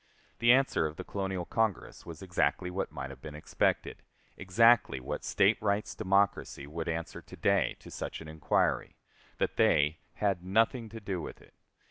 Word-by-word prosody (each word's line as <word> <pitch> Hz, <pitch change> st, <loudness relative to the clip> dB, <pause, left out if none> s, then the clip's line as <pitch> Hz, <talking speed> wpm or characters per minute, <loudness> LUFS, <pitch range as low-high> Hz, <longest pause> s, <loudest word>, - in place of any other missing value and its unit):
The 120 Hz, 0 st, +5 dB
answer 130 Hz, -10 st, +3 dB
of 75 Hz, -, -8 dB
the -, -, -5 dB
Colonial 95 Hz, -3 st, -3 dB
Congress 110 Hz, -5 st, -2 dB
was 85 Hz, +2 st, -8 dB
exactly 90 Hz, 0 st, 0 dB
what 95 Hz, +2 st, -3 dB
might 65 Hz, -, -6 dB
have 65 Hz, -2 st, -12 dB
been 75 Hz, -1 st, -8 dB
expected 75 Hz, -, -1 dB, 0.3 s
exactly 105 Hz, -, +4 dB
what 65 Hz, -, -5 dB
State 100 Hz, +3 st, +2 dB
rights 100 Hz, 0 st, 0 dB
Democracy 100 Hz, -8 st, 0 dB
would 80 Hz, +3 st, -5 dB
answer 85 Hz, 0 st, -4 dB
to -, -, -13 dB
day -, -, +2 dB
to -, -, -13 dB
such -, -, -5 dB
an 80 Hz, -, -10 dB
inquiry 80 Hz, 0 st, 0 dB, 0.4 s
that -, -, -1 dB
they 75 Hz, +3 st, +3 dB
"had 100 Hz, -4 st, -1 dB
nothing 110 Hz, +4 st, +1 dB
to 115 Hz, +1 st, -8 dB
do 95 Hz, -4 st, -4 dB
with -, -, -8 dB
it." -, -, -20 dB
95 Hz, 170 wpm, -30 LUFS, 80-105 Hz, 0.4 s, The